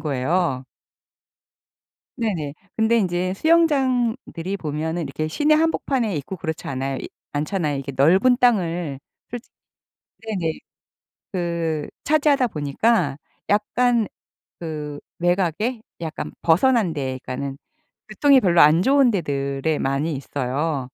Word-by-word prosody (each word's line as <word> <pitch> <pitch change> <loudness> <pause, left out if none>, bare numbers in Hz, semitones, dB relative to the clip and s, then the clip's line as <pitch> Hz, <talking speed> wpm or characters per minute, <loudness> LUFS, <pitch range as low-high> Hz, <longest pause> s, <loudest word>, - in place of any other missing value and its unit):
거예요. 140 -1 0 1.5
네네. 175 - -2 0.2
근데 225 +1 +3
인제 185 -3 0
수영장들이 255 - +1
보면은 160 +2 -3
이렇게 155 +2 -3
시내 300 - +2
한복판에 270 - 0
있고 145 +7 -5
그렇지 160 -1 -5
않아요 135 0 -2 0.4
않잖아요. 150 0 -1
이게 140 0 -5
넓은 190 - +5
땅을 175 - +1 0.3
솔직 245 0 -8 0.8
네네. 175 -7 -2 0.7
그 170 -4 -2 0.2
차지하다 285 -4 +3
보니까 150 0 0 0.3
약간 230 +2 +2 0.5
그 150 -3 -5 0.2
외곽에 185 +7 0 0.2
약간 160 -2 -5
벗어난 190 +1 +3
데에 130 -3 -3
그러니까는 135 +2 -5 0.5
교통이 270 +5 +4
별로 175 -4 +4
안 155 +4 +6
좋은 270 +1 +4
데들에 140 -4 -1
많이 140 +4 0
있어요. 140 +1 -2
170 Hz, 260 characters per minute, -22 LUFS, 145-230 Hz, 1.5 s, 안